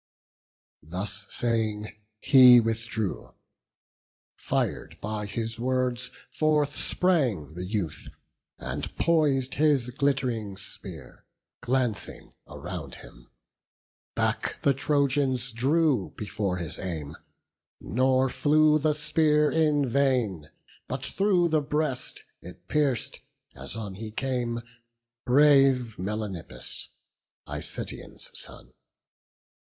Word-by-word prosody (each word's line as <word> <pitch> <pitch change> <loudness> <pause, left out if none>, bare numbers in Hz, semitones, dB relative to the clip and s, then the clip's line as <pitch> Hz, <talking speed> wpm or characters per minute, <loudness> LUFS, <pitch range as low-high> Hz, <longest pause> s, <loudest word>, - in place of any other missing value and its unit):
Thus 95 +4 -5
saying, 110 -3 -1 0.3
he 125 -2 +9
withdrew; 115 -2 -3 1.0
fir'd 80 +2 -2
by 105 0 -3
his 115 +2 -4
words, 125 0 0 0.2
Forth 150 -2 +1
sprang 130 - 0
the 90 +2 -5
youth, 95 -6 -3 0.5
and 65 +4 -5
pois'd 145 -6 +2
his 140 -5 +2
glitt'ring 125 -7 -1
spear, - - -10 0.4
Glancing 125 -3 -2
around - - -7
him; - - -17 0.9
back - - -1
the 140 - +4
Trojans 135 -2 +1
drew 135 - +1
Before 105 -3 -2
his 85 -3 -5
aim; 80 -5 -5 0.6
nor 130 +4 +2
flew 155 +3 +4
the 150 +1 +2
spear 150 0 +2
in 150 -3 +2
vain; 120 - +1 0.4
But - - -4
through 185 -3 +2
the 155 -1 +2
breast 145 -3 -2 0.2
it 90 +1 -12
pierc'd, 140 -6 0 0.4
as 70 - -8
on 105 -4 -5
he 110 +3 -6
came, 120 0 -2 0.7
Brave 135 -3 +5
Melanippus, 100 -2 -5 0.6
Icetaon's - - -6
son. - - -10
125 Hz, 95 wpm, -27 LUFS, 105-145 Hz, 1.0 s, he